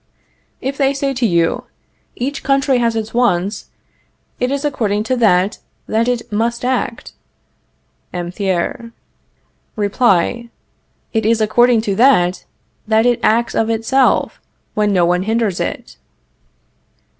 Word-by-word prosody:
If 270 +2 -3
they 275 0 +2
say 275 0 -1
to 245 -2 +1
you: 170 -3 0 0.5
Each 275 +3 -4
country 275 -1 +2
has 230 -1 +1
its 220 -1 -4
wants; 205 -4 0 0.7
it 250 - 0
is 280 +2 -2
according 215 -7 -1
to 255 +4 -1
that 200 -3 +2 0.3
that 225 +2 0
it 240 -1 -2
must 235 +3 -1
act 255 -1 -2 1.0
(M. 175 -1 -4
Thiers) 190 +4 -2 0.9
Reply: 215 +2 +1 0.6
It 220 -1 +1
is 230 0 +2
according 235 +2 +3
to 205 -3 -2
that 200 -8 +3 0.4
that 220 +1 +3
it 245 -1 +2
acts 235 +2 +2
of 225 - 0
itself 230 +4 +1 0.3
when 210 -1 +1
no 180 -3 +3
one 180 +1 +1
hinders 220 -2 -1
it. - - -5
230 Hz, 130 wpm, -17 LUFS, 205-245 Hz, 1.0 s, according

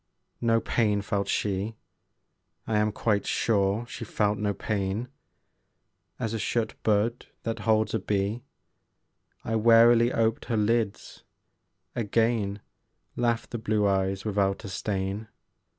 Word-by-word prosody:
No 115 -1 +3
pain 105 -3 +1
felt 100 -1 -1
she; 105 +2 -1 0.9
I 110 - 0
am 105 0 +2
quite 105 -1 0
sure 100 +1 +1
she 120 - -7
felt 105 -1 0
no 105 -1 0
pain. 100 +3 -2 1.1
As 115 -1 -2
a 115 - -2
shut 115 0 -1
bud 110 +3 +1 0.2
that 115 -1 -3
holds 110 0 +3
a 110 - +1
bee, 100 +3 -1 1.0
I 115 - -2
warily 115 +1 +6
oped 115 -2 0
her 115 -3 -1
lids: 105 -1 -1 0.7
again 110 -2 0 0.5
Laughed 120 -1 0
the 120 - -3
blue 110 -2 +1
eyes 95 0 0
without 100 -1 0
a - - -5
stain. 100 +2 -3
110 Hz, 125 wpm, -27 LUFS, 100-115 Hz, 1.1 s, warily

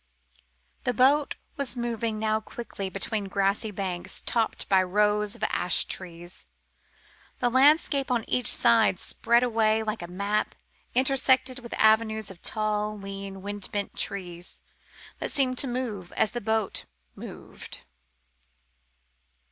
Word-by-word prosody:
The 250 - 0
boat 280 +4 +3 0.2
was 275 -3 -2
moving 230 -2 -2
now 215 0 +1
quickly 215 -3 -6
between 200 +2 -2
grassy 200 +3 0
banks 185 -3 -3
topped 230 -2 0
by 190 -1 +4
rows 210 +2 +1
of - - -9
ash 180 - +2
trees. 175 -1 -5 0.9
The 245 -1 +1
landscape 280 +1 +4
on 240 -3 0
each 250 - +2
side 225 -5 +4
spread 235 +6 +2
away 220 -2 +2
like 215 -1 -3
a 175 - -6
map 200 +4 -1 0.4
intersected 260 0 +3
with 235 -2 -7
avenues 220 -1 +3
of 175 - -14
tall, 215 -1 -1
lean, 195 -1 -7
wind 205 0 -3
bent 205 -1 -3
trees, 175 -3 -3 0.6
that - - -2
seemed 260 -3 +2
to 275 - +1
move 235 -8 -4
as 215 - +1
the 240 0 -4
boat 220 -1 -1 0.3
moved. - - -9
215 Hz, 130 wpm, -27 LUFS, 195-240 Hz, 0.9 s, by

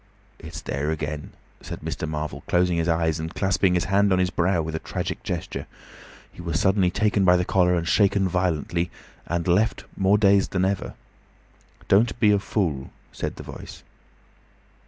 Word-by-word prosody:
"It's 80 0 -8
there 70 +2 -2
again," 75 -1 -4 0.3
said - - -7
Mr. 80 - -4
Marvel, 75 -2 -4
closing 90 -1 +2
his 85 0 0
eyes 80 -1 +1
and 80 +2 -5
clasping 95 -1 +2
his 90 - +2
hand 100 +1 +2
on 95 - +4
his 90 0 +1
brow 90 +1 +1
with 80 0 -5
a 80 - -2
tragic - - -4
gesture. 85 -2 -4 0.7
He - - -10
was 85 -1 -1
suddenly 95 -2 +3
taken 105 +1 +1
by 90 -1 +6
the 90 - 0
collar 90 -1 +3
and 85 -1 -2
shaken 100 -1 +3
violently, 85 -1 -1 0.4
and 85 0 -2
left 100 +5 +2
more 95 +2 +3
dazed 100 -2 +3
than 95 0 +2
ever. 95 0 -2 0.9
"Don't 110 +4 +3
be 105 -2 +5
a 100 - +3
fool," 80 -10 -2 0.2
said - - -4
the - - -9
Voice. - - -10
90 Hz, 175 wpm, -24 LUFS, 80-95 Hz, 0.9 s, by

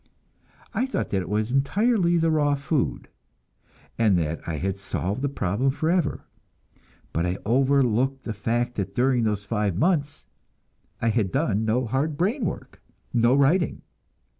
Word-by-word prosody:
I 255 - 0
thought 265 - -3
that 95 - +1
it 90 - -7
was 105 +3 -1
entirely 175 - +2
the 165 -1 +2
raw 145 -2 +2
food, 145 0 -2 0.9
and 105 -5 +4
that 80 -1 -2
I 85 - -2
had 95 +5 -2
solved 95 +3 -3
the 140 - 0
problem 110 +1 0
forever; 160 +3 0 0.9
but 85 +2 0
I 90 +2 -1
overlooked 130 +1 +2
the 110 - -4
fact 120 +4 -1
that 100 -1 -3
during 125 -1 +2
those 105 -2 -1
five 105 -6 -1
months 150 - 0 0.8
I 115 - +3
had 110 -5 0
done 110 -6 0
no 120 +4 +1
hard 140 +6 -1
brain 210 - 0
work, - - -6 0.3
no 120 +2 +4
writing. 150 +6 +2
125 Hz, 150 wpm, -25 LUFS, 105-145 Hz, 0.9 s, and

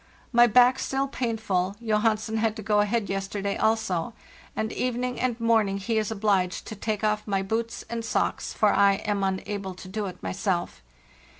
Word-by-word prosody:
My 240 0 +6
back 250 +3 +5
still 270 +1 -1
painful, 215 -7 -1
Johansen 220 0 +1
had 220 -1 +1
to 220 - -7
go 210 +1 +2
ahead 210 +1 +1
yesterday 195 +1 -2
also; 220 -3 0 0.4
and 220 0 -2
evening 250 0 -2
and 245 -2 -1
morning 220 -4 +2
he 220 +3 0
is 215 - -2
obliged 200 -4 0
to 215 - -7
take 215 +1 -3
off 215 0 0
my 195 -1 0
boots 225 +3 -3
and 235 -1 -4
socks, 225 - -1
for - - +3
lam 200 0 +2
unable 190 0 -3
to 185 - -11
do 205 +2 -3
it 185 - -9
myself. 185 - -2
215 Hz, 170 wpm, -26 LUFS, 195-230 Hz, 0.4 s, My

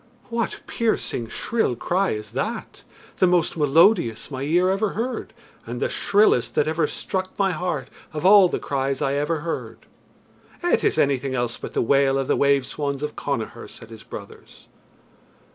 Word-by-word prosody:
"What 230 -1 -2
piercing, 220 - -1
shrill 175 - -1
cry 185 +10 0
is 105 -1 -6
that 210 - -4 0.3
the 185 - +4
most 175 -2 +2
melodious 150 - +3
my 130 -1 -5
ear 175 +6 +2
ever 195 +1 0
heard, 240 +4 -3 0.3
and - - -6
the - - 0
shrillest 125 - +2
that 150 - +2
ever 160 0 +1
struck 185 +3 -4
my 195 -1 +2
heart 160 -6 -3 0.2
of 150 +2 -5
all 195 -1 +8
the - - -1
cries 135 -1 -2
I 135 - +1
ever 150 +2 -1
heard?" 165 0 -5 0.8
"It 350 - +2
is - - +2
anything 135 -3 +1
else 120 -1 -1
but - - -8
the - - +2
wail 135 +2 +3
of 135 -1 -1
the - - +2
wave 140 -2 +3
swans 140 0 -3
of 150 - -4
Connachar," 120 -6 -4
said 115 0 -14
his 110 -1 -10
brothers. 100 -2 -11
150 Hz, 170 wpm, -23 LUFS, 135-185 Hz, 0.8 s, all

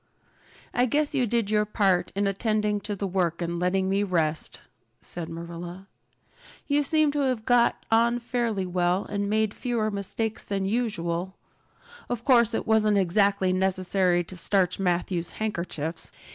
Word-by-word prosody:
"I 250 +1 +2
guess 295 +4 0
you 255 -4 +1
did 225 -2 0
your 210 0 +3
part 200 -3 +1
in 200 +1 +1
attending 210 +1 0
to 205 +1 -4
the 200 - -3
work 175 -3 0
and 170 0 -2
letting 190 +1 +1
me 195 +1 +1
rest," 165 -6 -1 0.4
said 170 -2 -4
Marilla. 170 +2 -7 0.8
"You 290 0 +2
seem 310 0 +3
to 290 - -2
have 255 -5 0
got 245 -1 +3
on 235 +1 +4
fairly 235 -5 -1
well 180 +1 0
and 200 0 -2
made 215 0 +1
fewer 230 -3 -1
mistakes 210 +2 -3
than 195 -1 -2
usual. 190 -5 -2 0.7
Of 240 -1 -3
course 235 -4 +4
it - - -2
wasn't 215 -2 +3
exactly 195 0 +2
necessary 185 -1 +1
to 185 - -10
starch 185 +1 +2
Matthew's 175 -1 -1
handkerchiefs! 170 -6 -3
200 Hz, 150 wpm, -26 LUFS, 180-225 Hz, 0.8 s, on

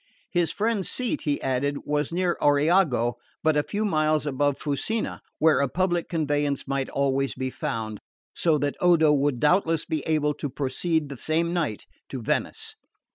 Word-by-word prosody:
His 175 -4 +2
friend's 215 -2 -1
seat, 255 +4 -2
he 145 -2 0
added, 135 +2 0
was 150 0 -1
near 175 0 0
Oriago, 145 - +3 0.2
but 155 -1 +3
a 150 - +4
few 210 +7 -2
miles 155 -5 +1
above 145 0 0
Fusina, 155 +10 -2 0.2
where 160 0 +4
a 140 -1 +1
public 175 +1 0
conveyance 145 -4 -1
might 135 -1 -1
always 135 0 0
be 130 0 -3
found; 110 -4 -4 0.3
so 160 -3 +2
that 145 -1 -1
Odo 165 -4 +5
would 140 -3 +1
doubtless 165 +1 +2
be 155 -2 -2
able 150 -2 +2
to 145 0 -5
proceed 145 +4 -1
the 140 - -7
same 165 +5 0
night 155 - -2 0.2
to 130 - -5
Venice. 115 - -2
150 Hz, 165 wpm, -25 LUFS, 140-170 Hz, 0.3 s, Odo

